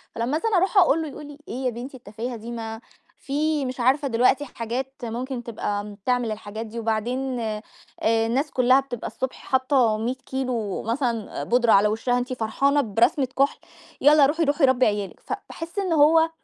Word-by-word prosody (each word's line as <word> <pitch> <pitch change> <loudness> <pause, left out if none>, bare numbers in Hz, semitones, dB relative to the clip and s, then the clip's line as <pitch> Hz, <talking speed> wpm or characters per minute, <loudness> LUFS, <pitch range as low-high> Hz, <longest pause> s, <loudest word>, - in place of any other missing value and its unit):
فلما 240 +7 0
مثلًا 430 +1 +1
اروح 385 +3 +1
اقول 330 -3 +5
له 315 - -3
يقول 295 +1 -9
لي: 290 -1 -11
"إيه 255 +2 -5
يا - - +3
بنتي 250 +3 -7
التفاهة 235 +2 -6
دي 230 +2 -8
ما 225 -1 -6 0.4
في 295 0 -1
مش 255 0 -5
عارفة 270 +4 +2
دلوقتي 255 +4 +2
حاجات 250 +2 -4
ممكن 240 +2 -4
تبقى 205 -3 -3
م 210 0 -9
بتعمل 240 +2 -1
الحاجات 215 +1 -6
دي 230 +2 -7
وبعدين 240 +4 -1
آآ، 215 -2 -3 0.7
الناس 270 +5 0
كلّها 255 +1 +4
بتبقى 250 -4 -5
الصبح 260 0 -4
حاطة 260 -4 +2
100 240 +4 -2
كيلو 250 -6 -3
مثلًا 230 -2 -2
آآ، - - -3
بودرة 240 -1 +3
على 200 +2 +6
وِشّها 235 +3 0
أنتِ 250 +1 -2
فرحانة 275 +5 +1
برسمة 245 +5 +2
كُحل! 275 - +3 0.4
يالّا 290 0 +7
روحي، 320 +4 +1
روحي 285 0 +3
ربّي 260 -1 +3
عيال 205 -2 0
لِك". - - -19
فباحس 335 +4 -6
إن 370 -4 0
هو 320 +2 +5
250 Hz, 185 wpm, -24 LUFS, 230-280 Hz, 0.7 s, يالّا